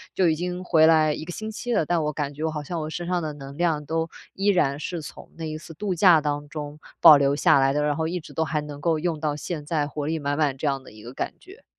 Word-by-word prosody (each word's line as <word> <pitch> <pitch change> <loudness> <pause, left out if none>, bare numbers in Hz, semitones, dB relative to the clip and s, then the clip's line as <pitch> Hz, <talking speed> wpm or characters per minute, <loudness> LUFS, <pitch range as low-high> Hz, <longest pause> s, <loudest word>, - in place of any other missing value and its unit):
就 185 -2 +3
已 160 - +3
经 180 +2 -4
回 160 -3 +5
来 155 -2 +4
1 155 - -6
个 175 - -7
星 215 +4 -5
期 240 +3 -5
了， 160 - +2
但 170 0 +1
我 150 - 0
感 145 -1 -3
觉 150 +2 -6
我 160 - +1
好 150 -1 -4
像 170 +3 -4
我 155 - -4
身 175 +2 -5
上 180 -1 0
的 155 -1 -3
能 140 -1 -10
量 160 -4 +1
都 165 +2 -1 0.2
依 195 +1 -2
然 150 -8 +2
是 170 +2 -4
从 - - -10
那 165 - -5
一 155 0 -4
次 165 +1 -11
度 195 +2 -2
假 175 -1 +6
当 145 -1 -3
中 150 -1 -7 0.2
保 160 -3 +10
留 140 0 +2
下 140 -1 +4
来 135 0 +3
的， 150 +1 +1
然 150 0 +1
后 160 +1 -1
一 180 +2 -2
直 170 - -13
都 160 - 0
还 155 -1 -1
能 145 -1 -8
够 165 -1 +1
用 160 0 -2
到 150 -1 -1
现 155 0 -5
在， 150 -1 0
活 150 0 -4
力 160 +1 -1
满 145 -1 -2
满 145 -4 +1
这 145 - -5
样 135 -2 0
的 - - -14
一 110 0 -14
个 120 - -9
感 - - -3
觉。 390 +6 -16
155 Hz, 315 characters per minute, -24 LUFS, 145-170 Hz, 0.2 s, 保